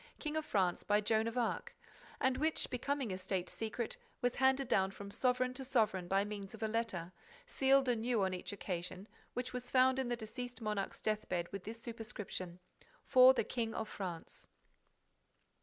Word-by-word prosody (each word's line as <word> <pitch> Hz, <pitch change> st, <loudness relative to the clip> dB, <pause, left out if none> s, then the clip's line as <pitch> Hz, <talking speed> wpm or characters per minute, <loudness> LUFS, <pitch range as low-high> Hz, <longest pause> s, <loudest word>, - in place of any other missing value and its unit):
King 300 Hz, 0 st, -3 dB
of 315 Hz, -1 st, -1 dB
France, 185 Hz, -4 st, +2 dB
by 205 Hz, 0 st, +3 dB
Joan 220 Hz, +1 st, +2 dB
of 230 Hz, +2 st, -3 dB
Arc 240 Hz, -2 st, -1 dB, 0.4 s
and 260 Hz, 0 st, +3 dB
which, 315 Hz, +2 st, +1 dB
becoming 265 Hz, -2 st, -1 dB
a 185 Hz, -, -4 dB
State 185 Hz, -1 st, -2 dB
secret, 225 Hz, +1 st, -3 dB, 0.2 s
was 245 Hz, 0 st, 0 dB
handed 265 Hz, 0 st, +3 dB
down 190 Hz, -4 st, +3 dB
from 200 Hz, +1 st, -9 dB
sovereign 255 Hz, +2 st, +1 dB
to 265 Hz, +1 st, -4 dB
sovereign 215 Hz, -9 st, +1 dB
by 195 Hz, +2 st, +3 dB
means 205 Hz, 0 st, -6 dB
of 220 Hz, -, -7 dB
a -, -, +2 dB
letter, 215 Hz, -6 st, -2 dB, 0.3 s
sealed 270 Hz, -, +4 dB
anew 235 Hz, -2 st, +2 dB
on 190 Hz, -1 st, +1 dB
each 180 Hz, -, -4 dB
occasion, 185 Hz, 0 st, -4 dB, 0.3 s
which 250 Hz, +1 st, -3 dB
was 250 Hz, 0 st, -4 dB
found 260 Hz, 0 st, +5 dB
in 260 Hz, -2 st, -1 dB
the 240 Hz, -, +1 dB
deceased 245 Hz, +2 st, -6 dB
monarch's 210 Hz, -3 st, -2 dB
death 215 Hz, 0 st, -1 dB
bed 175 Hz, -1 st, 0 dB
with 195 Hz, -2 st, -6 dB
this 225 Hz, +2 st, -6 dB
superscription: 215 Hz, -6 st, -5 dB, 0.5 s
"For 255 Hz, 0 st, +8 dB
the -, -, +2 dB
King 230 Hz, -2 st, -2 dB
of 220 Hz, -, -2 dB
France." 180 Hz, -6 st, -6 dB
225 Hz, 180 wpm, -36 LUFS, 195-255 Hz, 0.5 s, For